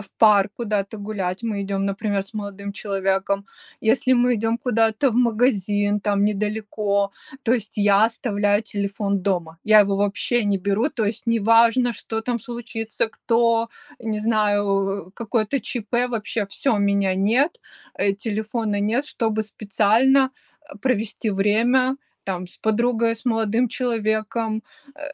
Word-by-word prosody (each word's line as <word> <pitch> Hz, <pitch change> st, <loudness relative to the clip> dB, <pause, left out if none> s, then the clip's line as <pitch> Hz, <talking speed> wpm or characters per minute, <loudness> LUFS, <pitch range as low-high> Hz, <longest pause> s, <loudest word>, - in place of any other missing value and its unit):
в 195 Hz, -2 st, -12 dB
парк 205 Hz, -2 st, +5 dB
куда-то 210 Hz, -2 st, -2 dB
гулять. 200 Hz, -2 st, -4 dB
Мы 210 Hz, -3 st, -2 dB
идём, 195 Hz, 0 st, -2 dB
например, 200 Hz, 0 st, -1 dB
с 195 Hz, -, -16 dB
молодым 200 Hz, -1 st, -6 dB
человеком, 195 Hz, 0 st, -1 dB, 0.4 s
если 255 Hz, +3 st, +2 dB
мы 245 Hz, 0 st, +3 dB
идём 225 Hz, +2 st, 0 dB
куда-то 225 Hz, +2 st, +1 dB
в 230 Hz, -, -2 dB
магазин 210 Hz, -4 st, +2 dB
там 200 Hz, 0 st, +1 dB
недалеко, 210 Hz, -1 st, -1 dB, 0.3 s
то 230 Hz, -, +2 dB
есть 225 Hz, -4 st, -1 dB
я 205 Hz, 0 st, +5 dB
оставляю 205 Hz, -3 st, 0 dB
телефон 200 Hz, -1 st, -2 dB
дома. 175 Hz, -4 st, -2 dB
Я 215 Hz, 0 st, +7 dB
его 200 Hz, -1 st, +2 dB
вообще 205 Hz, +4 st, 0 dB
не 200 Hz, -1 st, +1 dB
беру. 200 Hz, +7 st, 0 dB
То 230 Hz, -7 st, -2 dB
есть 210 Hz, +3 st, -3 dB
неважно, 230 Hz, +2 st, +4 dB
что 225 Hz, 0 st, -4 dB
там 235 Hz, +1 st, -2 dB
случится, 225 Hz, -1 st, -4 dB
кто, 230 Hz, 0 st, +1 dB, 0.3 s
не 220 Hz, -2 st, -3 dB
знаю, 210 Hz, -2 st, +2 dB, 0.4 s
э, -, -, -19 dB
какое-то 230 Hz, +3 st, -1 dB
ЧП, 240 Hz, 0 st, -1 dB
вообще 225 Hz, -1 st, -2 dB
всё, 220 Hz, +3 st, 0 dB
меня 200 Hz, -2 st, +1 dB
нет, 230 Hz, -, +3 dB, 0.5 s
э, 200 Hz, -, +3 dB
телефона 220 Hz, -1 st, -2 dB
нет. 230 Hz, +7 st, 0 dB
Чтобы 220 Hz, -6 st, -1 dB
специально, 225 Hz, +6 st, +2 dB, 0.4 s
э, -, -, -11 dB
провести 225 Hz, -3 st, -1 dB
время 235 Hz, +7 st, +2 dB, 0.3 s
там 185 Hz, -2 st, -3 dB
с 175 Hz, -, -12 dB
подругой, 230 Hz, +1 st, +1 dB
с 225 Hz, -, -14 dB
молодым 225 Hz, +1 st, +1 dB
человеком. 220 Hz, -2 st, -1 dB, 0.3 s
Э, 300 Hz, -, -17 dB
215 Hz, 145 wpm, -22 LUFS, 200-230 Hz, 0.5 s, Я